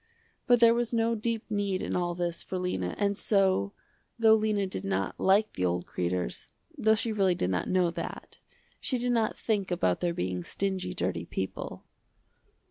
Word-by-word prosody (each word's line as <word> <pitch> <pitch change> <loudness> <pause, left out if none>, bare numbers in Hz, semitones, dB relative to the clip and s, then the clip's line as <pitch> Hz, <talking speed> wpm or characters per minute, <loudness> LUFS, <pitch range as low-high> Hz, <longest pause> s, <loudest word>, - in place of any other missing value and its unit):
But 245 -2 +5
there 230 0 +8
was 240 -1 0
no 230 0 +2
deep 225 0 -2
need 200 -2 0
in - - -2
all 175 -1 0
this 175 -1 -2
for 185 - -4
Lena 95 - -2
and 200 0 +1
so, 190 - +2 0.5
though 225 -1 +6
Lena 215 -2 +2
did 185 - -4
not 95 0 -2
like 200 +3 +3
the 90 - -3
old 90 0 0
Kreders, 90 -7 -3 0.3
though 220 -6 +3
she 225 +1 -1
really 195 -4 +2
did 90 - -1
not 90 - -1
know 180 -2 +2
that, - - -7 0.4
she 255 - -1
did 245 +1 0
not 225 -2 +1
think 205 -4 -1
about 130 - +1
their 175 -1 -1
being 90 -1 -2
stingy 185 - -2
dirty 90 - -2
people. 95 - -5
190 Hz, 180 wpm, -29 LUFS, -, 0.5 s, there